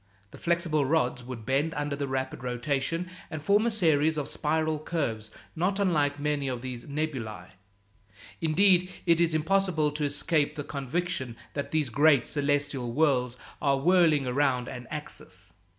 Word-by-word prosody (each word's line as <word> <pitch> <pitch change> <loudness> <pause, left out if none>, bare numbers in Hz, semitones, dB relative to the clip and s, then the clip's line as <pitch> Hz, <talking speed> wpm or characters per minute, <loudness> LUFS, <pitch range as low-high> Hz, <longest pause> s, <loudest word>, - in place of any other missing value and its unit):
The - - -12
flexible 170 -3 +1
rods 130 -4 +1
would 120 -3 -8
bend 140 +5 0
under 145 -1 -2
the 140 0 -3
rapid 130 -1 -3
rotation, 135 +7 -1 0.2
and 155 - -5
form 205 +8 +3
a - - +4
series 160 -7 +2
of 145 - -2
spiral 155 0 0
curves 130 -10 -3 0.3
not 185 +4 0
unlike 150 -7 +1
many 145 -1 -1
of 125 -2 -3
these 125 -2 -6
nebulæ. 130 - -4 0.9
Indeed, 180 +3 +4 0.2
it 170 -1 +4
is 165 -2 +2
impossible 160 -2 +2
to 150 +1 -3
escape 145 +1 0
the 145 - -4
conviction 140 -2 -3 0.2
that 140 - -3
these 155 -4 0
great 145 0 +5
celestial 145 -3 -1
whorls 125 -4 +1 0.2
are 140 -2 +3
whirling 160 -2 +4
around 125 -1 +1
an 125 -1 -7
axis. 95 - -7
145 Hz, 150 wpm, -28 LUFS, 130-160 Hz, 0.9 s, great